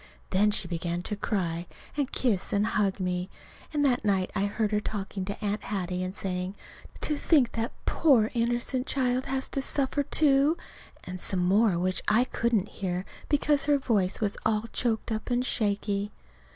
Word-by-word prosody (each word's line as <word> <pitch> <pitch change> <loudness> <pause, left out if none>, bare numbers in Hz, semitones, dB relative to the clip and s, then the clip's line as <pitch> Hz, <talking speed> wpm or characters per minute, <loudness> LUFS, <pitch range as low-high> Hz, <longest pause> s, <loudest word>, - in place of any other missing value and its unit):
Then 205 +3 +4
she 205 -3 -1
began 170 0 -2
to 210 - -2
cry, 175 -5 -2 0.3
and 285 -2 -1
kiss 220 -8 0
and 205 +1 +2
hug 205 -3 +1
me. 180 0 -1 0.4
And 295 -2 +1
that 250 -3 +2
night 195 -3 +1
I 200 0 +1
heard 210 +1 -1
her 210 - +2
talking 200 -2 -4
to 200 +1 -4
Aunt 205 +1 -2
Hattie 185 -3 -2
and 185 +1 -3
saying, 185 0 -3 0.5
"To 300 - +1
think 285 -4 +3
that 225 - -2
that 230 - -6
poor 245 -9 +4
innocent 240 +2 0
child 255 -1 +1
has 265 0 0
to 275 - 0
suffer, 275 +1 +1
too!" 285 +2 +3 0.5
and 180 0 -6
some 180 -2 0
more 200 0 +4
which 185 +1 0
I 220 +4 +5
couldn't 230 -5 0
hear, 185 -1 -3 0.2
because 290 -1 +2
her 290 -1 +4
voice 205 -8 +1
was 205 -2 0
all 215 -1 +1
choked 225 -2 -1
up 220 +2 -3
and 245 +1 +1
shaky. 205 -2 0
210 Hz, 180 wpm, -28 LUFS, 190-250 Hz, 0.5 s, I